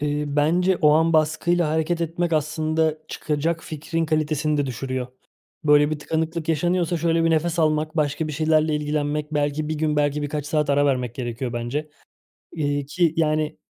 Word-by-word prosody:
Eee, 150 0 -1
bence 170 +6 +2
o 150 -2 +4
an 160 +2 +3
baskıyla 160 +2 +2
hareket 160 +2 0
etmek 170 +1 -1
aslında 155 +1 0
çıkacak 160 +2 -2
fikrin 160 +2 -3
kalitesini 155 -1 0
de 145 -1 0
düşürüyor. 130 0 -3 0.6
Böyle 150 0 +5
bir 155 - -2
tıkanıklık 160 +1 -3
yaşanıyorsa 175 +2 +1
şöyle 165 0 +1
bir 165 - +3
nefes 165 +1 0
almak, 155 0 +1
başka 150 +1 0
bir - - -4
şeylerle 155 0 +2
ilgilenmek, 150 0 -2
belki 145 +1 0
1 155 - -1
gün, 150 -1 0
belki 145 0 +1
birkaç 145 0 -3
saat 150 -2 0
ara 145 +1 +3
vermek 125 -3 0
gerekiyor 120 0 -4
bence. 130 +6 -3 0.6
Eee, 145 -3 -1
ki, 165 +1 +1
yani, 155 -1 0
155 Hz, 165 wpm, -23 LUFS, 145-160 Hz, 0.6 s, Böyle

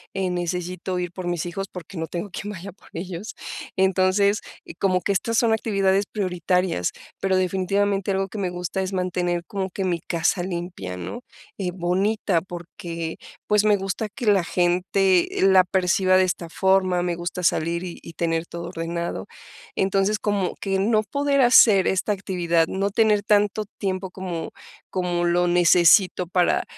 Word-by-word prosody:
eh, 190 -2 -1
necesito 180 +1 -3
ir 175 -1 -3
por 180 0 -6
mis 175 -2 -2
hijos, 195 +3 -4
porque 180 +1 -10
no 165 -1 -3
tengo 180 +4 -5
quien 205 +3 -5
vaya 195 0 -8
por 185 - -21
ellos, 180 +3 -6 0.4
entonces, 190 +2 +3 0.4
como 185 -2 +2
que 200 - 0
estas 225 +4 0
son 230 -1 +3
actividades 200 -3 +1
prioritarias, 180 - 0 0.3
pero 190 -1 +1
definitivamente 195 +2 0
algo 195 0 0
que 210 - -6
me 190 -2 -1
gusta 180 +2 -3
es 190 +1 -3
mantener 180 -1 -1
como 195 0 -3
que 195 - -4
mi 175 -2 0
casa 170 +2 0
limpia, 175 - -5
¿no?, 90 - -6 0.3
y 190 -3 -3
bonita, 185 +1 0
porque, 170 -2 -7 0.3
pues, 210 0 +3
me 210 -1 +4
gusta 195 +3 -3
que 240 +4 -7
la 200 -4 +4
gente 180 +1 +2 0.2
la 190 -1 +6
perciba 185 0 +2
de 185 - +5
esta 175 -2 -2
forma, 185 0 +2
me 175 -1 -1
gusta 175 +1 -5
salir 170 +1 +1
y 175 -2 -7
y 165 - -11
tener 165 0 -1
todo 170 0 -6
ordenado, 170 0 -4 0.5
entonces, 195 +2 +1
como 205 -3 -1
que 195 -1 0
no 215 +2 +2
poder 280 +5 +1
hacer 225 -6 +6
esta 190 +2 0
actividad, 175 -4 0
no 195 +3 -1
tener 215 -1 +3
tanto 210 +1 +2
tiempo 190 -1 -2
como, 180 -3 -5 0.4
como 175 -2 -1
lo 175 +1 +2
necesito 175 +1 +5
para, 180 0 +2
185 Hz, 165 wpm, -23 LUFS, 175-195 Hz, 0.5 s, la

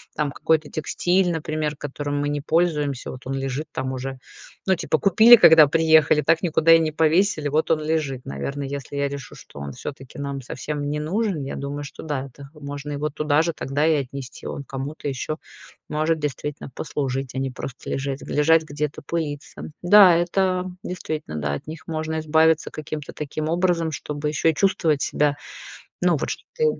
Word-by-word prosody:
там 150 -2 -1
какой-то 155 0 +1
текстиль, 180 +4 +1
например, 155 -2 -2
которым 145 0 -3
мы 145 - 0
не 145 0 -1
пользуемся. 150 -3 0
Вот 130 0 -10
он 135 - -2
лежит 135 +2 -3
там 130 0 -2
уже. 130 0 -5 0.5
Ну, 190 - +3
типа 160 -3 0
купили, 220 - +8
когда 160 -9 +8
приехали, 160 -1 +4
так 165 +2 +2
никуда 165 -2 +3
и 165 - +7
не 155 -2 -1
повесили. 160 -1 +2
Вот 155 +2 +1
он 155 -1 +2
лежит. 150 -5 -1
Наверно, 140 - -4
если 140 0 -6
я 140 0 0
решу, 140 -2 -8
что - - -13
он 70 -1 -6
всё-таки 135 -1 -8
нам 140 -1 -4
совсем 145 +3 -4
не 150 +1 -2
нужен, 180 -1 -1
я 135 - -5
думаю, 140 +1 -4
что 145 - -9
да, 145 -4 -3
это 140 +2 -13
можно 145 -1 -6
его 150 +2 -2
туда 150 0 +1
же 170 +1 0
тогда 145 -1 -1
и 160 -1 +4
отнести. 130 -1 -8
Он 140 - -5
кому-то 140 +2 -5
еще 140 +4 -3 0.5
может 155 +1 0
действительно 150 0 -4
послужить, 135 -1 -3
а 130 - -3
не 135 0 -1
просто 125 +1 -8
лежать 135 0 -3
лежать 160 +2 +3
где-то, 150 -1 -4
пылиться. 155 -3 -5
Да, 185 -1 +8
это 180 +1 +1 0.2
действительно. 155 - -5
Да, 75 -1 -1
от 70 - -5
них 160 +1 -9
можно 160 0 -2
избавиться 160 0 +3
каким-то 150 -1 -6
таким 155 +1 -4
образом, 170 -1 +1
чтобы 150 0 -4
еще 155 +2 +2
чувствовать 165 -5 +1
себя, 145 -1 +1 0.6
ну, - - +3
вот - - -3
что - - -5
ты 475 -1 0
150 Hz, 180 wpm, -23 LUFS, 140-160 Hz, 0.6 s, купили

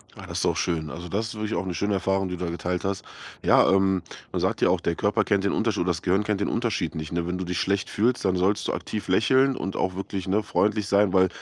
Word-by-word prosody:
Ah, - - -10
das - - -4
ist - - 0
auch - - +2
schön. 80 -3 -1
Also, 85 +2 -7
das 110 +3 -1
ist 110 - -7
wirklich 105 0 -3
auch 85 +3 -2
'ne 90 - -3
schöne 100 +5 -1
Erfahrung, 95 0 0
die 90 - -4
du 90 - -3
da - - -2
geteilt 90 +1 -3
hast. 100 -1 -2 0.4
Ja, - - +5
ähm, 95 -1 +3 0.3
man - - -1
sagt - - 0
ja - - +4
auch, - - +2
der 85 - 0
Körper 105 - +1
kennt 100 -2 +1
den 100 - +1
Untersch 110 -2 0
oder 85 - 0
das 85 -1 0
Gehirn 95 +3 +2
kennt 105 -1 -1
den - - +1
Unterschied 115 -8 -1
nicht, 80 +1 -5
ne? 85 0 -1
Wenn 90 +1 -2
du 95 - -3
dich 90 -1 -2
schlecht 100 0 0
fühlst, 120 +4 +1
dann 95 -1 +2
sollst 95 +3 +1
du - - -1
aktiv 105 - -4
lächeln 130 +7 +4
und 95 -4 -4
auch 95 -1 -1
wirklich, 95 -1 -4
ne, 105 +3 +1
freundlich 105 0 +1
sein, 100 -2 +3
weil 95 -1 +5
95 Hz, 285 wpm, -25 LUFS, 90-105 Hz, 0.4 s, Ja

